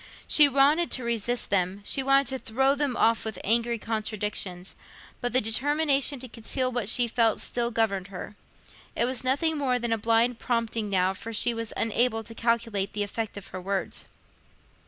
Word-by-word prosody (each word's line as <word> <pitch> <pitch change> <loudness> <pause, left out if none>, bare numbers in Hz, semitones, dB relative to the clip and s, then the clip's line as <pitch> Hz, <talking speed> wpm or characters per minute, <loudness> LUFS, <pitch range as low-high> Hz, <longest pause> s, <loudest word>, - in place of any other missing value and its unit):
She 295 -2 +7
wanted 285 +5 +3
to 255 - -1
resist 235 +1 -1
them—she 200 +6 0
wanted 275 +1 +3
to 265 0 -3
throw 265 +5 +1
them 280 -4 -1
off 230 0 +2
with 220 -3 -5
angry 235 +2 +1
contradiction—but 210 0 -4
the 255 - +4
determination 280 +4 +1
to 255 - -6
conceal 255 +2 -2
what 240 -4 -1
she 240 +1 +4
felt 230 -1 +2
still 240 -1 -2
governed 215 -5 -1
her. 195 +2 -8 0.6
It 235 - +1
was 255 +1 -2
nothing 290 +4 +1
more 255 -3 +1
than 235 -1 -1
a 225 - -1
blind 230 +2 +2
prompting 230 -3 -1
now, 190 -1 +2
for 225 +4 -8
she 230 +2 +2
was 230 -1 -4
unable 225 0 +1
to 230 - -10
calculate 230 -4 0
the 210 0 -1
effect 215 +1 -5
of 200 - -9
her 185 - -7
words. 195 +1 -3
230 Hz, 175 wpm, -26 LUFS, 210-255 Hz, 0.6 s, She